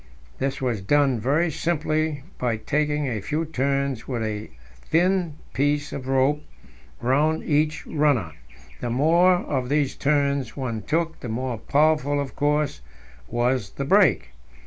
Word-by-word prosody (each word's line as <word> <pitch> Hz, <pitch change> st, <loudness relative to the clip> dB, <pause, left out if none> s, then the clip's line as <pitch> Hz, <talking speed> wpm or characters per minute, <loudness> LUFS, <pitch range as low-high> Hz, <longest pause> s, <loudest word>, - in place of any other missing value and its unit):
This 135 Hz, 0 st, -1 dB
was 120 Hz, -6 st, -1 dB
done 135 Hz, +3 st, +2 dB
very 150 Hz, +9 st, +1 dB
simply 155 Hz, -2 st, -1 dB, 0.2 s
by 120 Hz, -3 st, 0 dB
taking 150 Hz, +5 st, 0 dB
a 115 Hz, -6 st, -2 dB
few 155 Hz, +10 st, -2 dB
turns 140 Hz, -4 st, -1 dB
with 120 Hz, -4 st, -2 dB
a 105 Hz, -1 st, -4 dB, 0.3 s
thin 175 Hz, -, +1 dB, 0.2 s
piece 145 Hz, +2 st, 0 dB
of 130 Hz, -1 st, -6 dB
rope 135 Hz, +3 st, +2 dB, 0.6 s
round 145 Hz, +6 st, +2 dB
each 155 Hz, 0 st, 0 dB
runner; 145 Hz, -, +1 dB, 0.5 s
the 120 Hz, -, -3 dB
more 165 Hz, +9 st, +4 dB
of 130 Hz, -7 st, -2 dB
these 145 Hz, -2 st, +1 dB
turns 140 Hz, -4 st, 0 dB
one 120 Hz, -5 st, -3 dB
took, 165 Hz, -, -1 dB
the 120 Hz, -, -6 dB
more 120 Hz, 0 st, -3 dB
powerful, 145 Hz, +1 st, +2 dB
of 140 Hz, -2 st, -4 dB
course, 150 Hz, -, 0 dB, 0.5 s
was 120 Hz, -2 st, 0 dB
the 140 Hz, -, -4 dB
brake. 150 Hz, -, +3 dB
140 Hz, 140 wpm, -24 LUFS, 125-150 Hz, 0.6 s, more